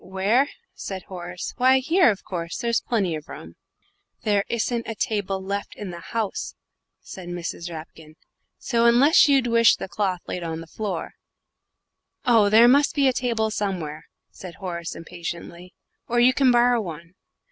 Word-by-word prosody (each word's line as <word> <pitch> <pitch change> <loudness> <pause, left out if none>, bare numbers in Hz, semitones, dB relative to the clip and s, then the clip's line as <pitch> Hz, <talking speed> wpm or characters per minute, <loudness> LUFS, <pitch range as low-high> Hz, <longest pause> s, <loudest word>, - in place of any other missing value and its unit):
"Where?" 200 +9 +1 0.2
said 190 -2 -6
Horace. 175 -1 -7
"Why, 260 +1 +5
here, 325 +5 +4
of 200 -3 -2
course. 170 -2 -5
There's 235 -1 0
plenty 200 -8 -1
of 155 -1 -7
room." 80 - -10 0.7
"There 205 -2 +2
isn't 235 0 -1
a 225 - -4
table 205 -4 -2
left 200 +1 -4
in 205 -3 -7
the 170 - -8
house," 215 +3 -4 0.5
said 180 -2 -10
Mrs. 175 0 -5
Rapkin; 160 -1 -10 0.4
"so, 235 -1 +1
unless 270 +8 +6
you'd 275 -3 +3
wish 230 -1 +5
the - - -6
cloth 185 -2 -2
laid 180 - -4
on 165 -1 -4
the 165 - -8
floor 190 -1 -5 0.6
" - - -48
"Oh, 210 -2 +5
there 225 +3 +7
must 280 +3 +4
be 280 -2 +3
a 260 - +3
table 230 -3 -1
somewhere," 175 -8 -4 0.2
said 180 -2 -10
Horace, 170 -3 -5
impatiently, 170 +1 -8 0.3
"or 240 0 +1
you 250 +2 +5
can 270 -1 +3
borrow 240 -1 +4
one. 170 -2 -8
200 Hz, 165 wpm, -24 LUFS, 175-235 Hz, 0.7 s, there